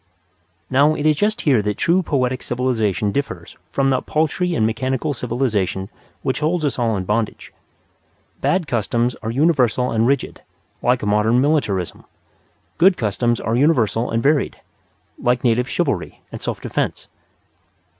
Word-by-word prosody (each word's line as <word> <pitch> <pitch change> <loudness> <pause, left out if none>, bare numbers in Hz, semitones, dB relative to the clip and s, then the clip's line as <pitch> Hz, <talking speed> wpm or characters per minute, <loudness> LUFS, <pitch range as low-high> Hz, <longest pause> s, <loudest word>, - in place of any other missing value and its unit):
Now, 145 +6 +3
it 145 - -3
is 155 -1 +4
just 210 +7 0
here 130 -8 +3
that 105 0 -2
true 175 +3 +2
poetic 130 -6 -1
civilization 115 -5 0
differs 140 +6 -4 0.2
from 135 0 +1
that 130 - -1
paltry 165 +3 0
and 110 - +2
mechanical 130 +6 -1
civilization 110 -7 -1 0.3
which 130 0 -1
holds 155 +1 0
us 140 - -1
all 115 -3 +1
in 95 - -2
bondage. 105 +3 -2 0.9
Bad 185 -2 +1
customs 120 0 0
are 110 - -4
universal 125 -2 +2
and 115 +1 +2
rigid, 140 0 -1 0.4
like 125 -1 +1
modern 105 +3 +2
militarism. 125 - 0 0.7
Good 185 +1 +5
customs 120 +2 0
are 115 - -1
universal 125 -5 +2
and 115 0 -1
varied, 145 0 +1 0.6
like 120 0 +1
native 125 +1 +2
chivalry 140 - -2
and - - -7
self - - -3
defence. - - -3
125 Hz, 145 wpm, -20 LUFS, 115-145 Hz, 0.9 s, Good